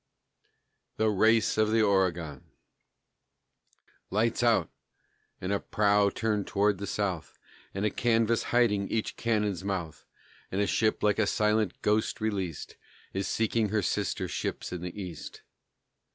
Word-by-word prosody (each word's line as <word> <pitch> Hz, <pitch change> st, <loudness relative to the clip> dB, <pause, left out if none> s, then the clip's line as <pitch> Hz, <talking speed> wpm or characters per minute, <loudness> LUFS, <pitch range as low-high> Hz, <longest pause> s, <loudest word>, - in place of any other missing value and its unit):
THE 110 Hz, 0 st, +2 dB
RACE 110 Hz, +2 st, +3 dB
OF 110 Hz, 0 st, +3 dB
THE 110 Hz, 0 st, +3 dB
OREGON 85 Hz, -8 st, 0 dB, 1.6 s
Lights 110 Hz, +4 st, +1 dB
out! 115 Hz, -9 st, +2 dB, 0.7 s
And 95 Hz, +2 st, -2 dB
a 100 Hz, -, +1 dB
prow 105 Hz, -1 st, +2 dB
turned 105 Hz, -2 st, -1 dB
towards 100 Hz, -1 st, +1 dB
the 100 Hz, -, -4 dB
South, 95 Hz, -6 st, -3 dB, 0.4 s
And 100 Hz, +2 st, -1 dB
a 105 Hz, -, +1 dB
canvas 115 Hz, -1 st, +1 dB
hiding 105 Hz, -5 st, +2 dB
each 110 Hz, -1 st, -2 dB
cannon's 105 Hz, -5 st, -1 dB
mouth, 95 Hz, -5 st, -4 dB, 0.4 s
And 95 Hz, -, -1 dB
a 100 Hz, -, +3 dB
ship 110 Hz, +1 st, +1 dB
like 105 Hz, 0 st, +2 dB
a 105 Hz, -, +3 dB
silent 105 Hz, -2 st, +1 dB
ghost 105 Hz, +1 st, +1 dB
released 95 Hz, -7 st, -3 dB, 0.4 s
Is 95 Hz, 0 st, -2 dB
seeking 110 Hz, -1 st, 0 dB
her 105 Hz, -1 st, 0 dB
sister -, -, -1 dB
ships -, -, -4 dB
in 90 Hz, -, -5 dB
the 90 Hz, +3 st, -6 dB
East. 90 Hz, -4 st, -8 dB
105 Hz, 135 wpm, -29 LUFS, 95-110 Hz, 1.6 s, RACE